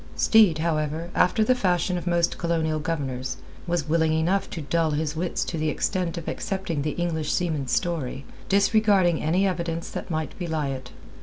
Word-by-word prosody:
Steed, 215 -8 +5
however, 160 +1 -1
after 215 +4 +3
the 255 - +4
fashion 180 -6 +1
of 175 0 -4
most 170 -1 +1
Colonial 160 -2 0
governors, 135 -5 -3 0.3
was 170 -3 -1
willing 160 0 +2
enough 170 +5 +1
to - - -5
dull 160 +3 +1
his 155 0 -2
wits 170 +2 -1
to 165 - -4
the 155 0 +1
extent 180 +1 -1
of 165 - -6
accepting 190 -6 -2
the 150 +1 -1
English 160 -3 -1
seaman's 155 -7 -1
story, 145 -6 -1 0.2
disregarding 200 -4 +3
any 175 +6 +2
evidence 170 -2 -3
that - - -6
might 160 -2 -3
belie 160 -5 -1
it. 130 -2 -5
165 Hz, 170 wpm, -25 LUFS, 155-180 Hz, 0.3 s, Steed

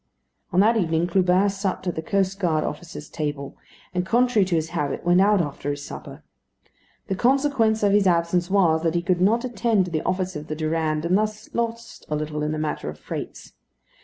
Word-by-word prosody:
On 185 0 +4
that 225 +3 +4
evening, 165 -4 +1
Clubin 185 +2 +3
supped 195 -1 -2
at 180 - -1
the 160 - -4
coast 195 -1 0
guard 160 -5 +1
officers' 150 -1 -6
table; 145 -3 -4 0.4
and, 180 0 0
contrary 235 +1 +3
to 180 -2 0
his 160 0 -1
habit, 150 -2 -3
went 175 +1 +5
out 205 -1 +4
after 145 -2 -4
his 145 0 -4
supper. - - -9 0.8
The - - -2
consequence 245 -1 +2
of 200 - +4
his 200 -1 +4
absence 175 0 +1
was, 175 -5 +3
that 165 0 0
he 170 - 0
could 180 0 +1
not 230 +6 +3
attend 230 -5 +1
to 180 - -7
the 155 -1 -1
office 185 -1 -2
of 150 0 -6
the 155 - -3
Durande, 155 0 -1
and 180 - +3
thus 215 0 -4
lost 230 0 -4
a 150 - 0
little 150 0 -3
in 150 0 -1
the 155 - -2
matter 155 - -3
of 75 - -8
freights. - - -7
180 Hz, 205 wpm, -24 LUFS, 155-205 Hz, 0.8 s, went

